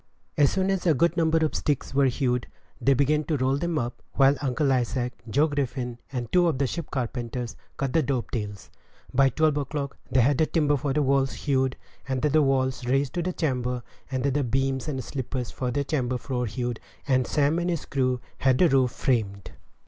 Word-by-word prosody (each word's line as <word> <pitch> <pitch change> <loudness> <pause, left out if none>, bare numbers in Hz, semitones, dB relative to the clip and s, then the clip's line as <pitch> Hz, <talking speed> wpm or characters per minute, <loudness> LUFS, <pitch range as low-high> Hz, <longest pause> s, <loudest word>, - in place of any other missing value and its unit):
As 145 -2 +4
soon 190 0 +1
as 190 -2 -1
a 160 - +5
good 170 +5 +2
number 165 -1 +3
of 155 - -2
sticks 145 -3 -1
were 140 0 +4
hewed, 125 -1 0 0.3
they 135 0 +4
began 150 +3 +2
to 150 +1 0
roll 130 +1 +1
them 170 +2 -1
up, 120 -2 -3
while 135 0 +5
Uncle 135 +1 +1
Isaac, 125 0 -1 0.2
Joe 145 +8 +3
Griffin, 130 -5 -3
and 125 -3 -4
two 180 -1 +4
of 160 -5 +1
the 140 - +1
ship 165 +4 -4
carpenters, 120 -2 -3 0.2
cut 135 -3 -2
the 165 - +4
dovetails. 115 -7 -3 0.4
By 135 +1 +5
twelve 155 +2 +2
o'clock 140 -1 -3
they 130 0 +4
had 135 +3 +3
the 155 - +3
timber 150 -3 +2
for 145 0 -1
the 150 +2 +2
walls 135 0 +2
hewed, 130 -2 0 0.3
and 130 -1 -1
the 150 +1 +4
walls 130 -2 +1
raised 135 +1 +1
to 175 - -1
the 180 +2 -1
chamber, 125 -7 -1 0.3
and 130 -2 -2
the 140 +1 +1
beams 135 +1 0
and 135 -4 -3
sleepers 130 -1 -4
for 125 - -3
the 140 +3 0
chamber 130 -3 -1
floor 125 -1 -2
hewed, 120 +1 -3 0.3
and 130 -3 +2
Sam 150 +3 +2
and 175 +1 -1
his 170 -4 -2
crew 130 -2 0 0.2
had 130 -1 +3
the 175 - +5
roof 130 -2 +3
framed. 110 -7 -1
135 Hz, 200 wpm, -26 LUFS, 125-145 Hz, 0.4 s, a